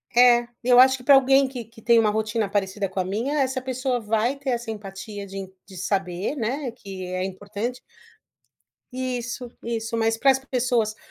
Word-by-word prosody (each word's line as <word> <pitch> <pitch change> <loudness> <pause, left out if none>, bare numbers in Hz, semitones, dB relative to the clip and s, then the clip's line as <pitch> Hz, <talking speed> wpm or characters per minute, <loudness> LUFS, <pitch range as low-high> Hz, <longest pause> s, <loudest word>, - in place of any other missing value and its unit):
É. 240 -1 +6 0.2
Eu 245 0 +6
acho 260 +1 +7
que 250 - -14
pra 280 - +6
alguém 270 +1 +5
que 255 -3 -6
que 225 +1 -18
tem 235 -2 +5
um 215 -2 +3
rotina 215 -1 -1
parecida 195 -1 -1
com 190 - -4
a 185 - 0
minha. 235 +10 -1
Essa 260 0 -1
pessoa 255 -1 -1
vai 225 +4 0
ter 275 -1 -5
essa 240 -2 -2
empatia 200 0 -7
de 195 +1 -8
en 190 -1 -6 0.2
de 190 -2 -12
saber, 190 - -2
né, 255 +2 -2
que 195 -4 -8
é 185 0 -3
importante 205 +6 -5 1.1
Isso, 250 -1 -4
isso. 230 0 -3
Mas 225 0 +1
para 270 +3 +5
as 265 - 0
pessoas, 245 -5 0
230 Hz, 190 wpm, -24 LUFS, 205-255 Hz, 1.1 s, acho